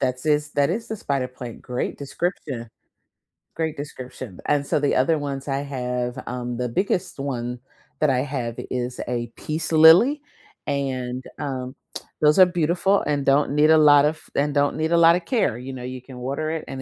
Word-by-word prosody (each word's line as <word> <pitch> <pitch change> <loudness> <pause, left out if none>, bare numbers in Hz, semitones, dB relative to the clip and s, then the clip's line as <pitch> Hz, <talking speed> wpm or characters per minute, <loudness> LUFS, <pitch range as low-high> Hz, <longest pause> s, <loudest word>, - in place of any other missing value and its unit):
That's 130 +2 -2
is 150 -1 +1
That 145 +1 +2
is 225 +5 -3
the 220 - -3
spider 135 -7 -2
plant, 125 -2 -9
great 125 0 -3
description. 140 -5 -4 0.9
Great 160 -1 -2
description. 130 -7 -8
And 145 -1 +2
so - - +1
the 145 -1 +1
other 155 +5 +3
ones 140 -1 -5
I 135 -1 -1
have, 125 -2 -3
um, 125 -1 -4
the 125 0 -1
biggest 180 - -1
one 125 -3 -3 0.4
that 155 - +3
I 130 -2 +2
have 130 -4 -3 0.2
is 125 0 -3
a 120 -1 -2
peace 155 +2 -3
lily, 165 - +7 0.5
and, 130 -3 -2 0.2
um, 130 -3 -4 0.5
those 150 +3 +5
are 185 - +10
beautiful 175 +3 +1
and 145 -2 -1
don't 140 +1 +3
need 150 +2 +4
a 160 - +7
lot 145 -1 +7
of 155 +1 -1
and 145 +1 +1
don't 145 0 +1
need 160 +1 -1
a - - +5
lotta 170 +1 +6
care. 180 - 0
You 130 +2 -7
know, 125 -1 -7
you 130 0 -6
can 130 0 -12
water 140 +5 -3
it, 160 -1 -4
and 135 - -6
140 Hz, 190 wpm, -23 LUFS, 125-155 Hz, 0.9 s, are